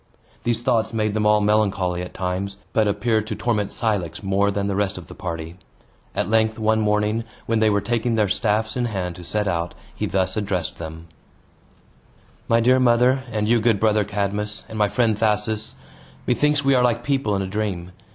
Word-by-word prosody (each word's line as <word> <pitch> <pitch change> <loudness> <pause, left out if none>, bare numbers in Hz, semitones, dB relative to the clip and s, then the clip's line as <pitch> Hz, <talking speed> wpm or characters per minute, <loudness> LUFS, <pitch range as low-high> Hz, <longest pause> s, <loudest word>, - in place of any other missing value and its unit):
These 120 -1 -1
thoughts 115 -3 +1
made 110 -2 0
them 105 0 +1
all 105 0 +4
melancholy 100 -4 +1
at 90 - -8
times, 95 +2 -3 0.2
but 110 -1 +3
appeared 110 +1 0
to 110 - -3
torment 105 -4 0
Cilix 105 -7 -2
more 100 +1 +2
than 100 0 -1
the 100 -1 -1
rest 100 -1 0
of 90 - -8
the - - -11
party. 85 -1 -6 0.6
At - - 0
length, 110 +1 +2
one 110 0 +2
morning, 105 +1 +1 0.2
when 115 -1 +1
they 110 0 +4
were 100 -1 +2
taking 115 +1 0
their 105 -2 +2
staffs 110 +2 0
in 125 -1 0
hand 95 -6 -3
to 90 - -9
set 105 +3 0
out, 85 -2 -2 0.2
he - - -2
thus 95 -1 0
addressed 95 -6 -2
them: 80 0 -7 1.4
"My 115 - +4
dear 125 +3 +4
mother, 125 +2 +3
and 105 -1 -1
you, 115 0 +3
good 110 -3 +3
brother 110 0 +3
Cadmus, 105 0 -3
and - - -9
my 105 - +4
friend 115 0 +1
Thasus, 105 0 0 0.5
methinks 145 +4 +2
we 135 - +5
are 125 - +4
like 120 -1 +1
people 135 -7 0
in 95 - 0
a - - -4
dream. 95 -3 -3
105 Hz, 195 wpm, -22 LUFS, 100-115 Hz, 1.4 s, we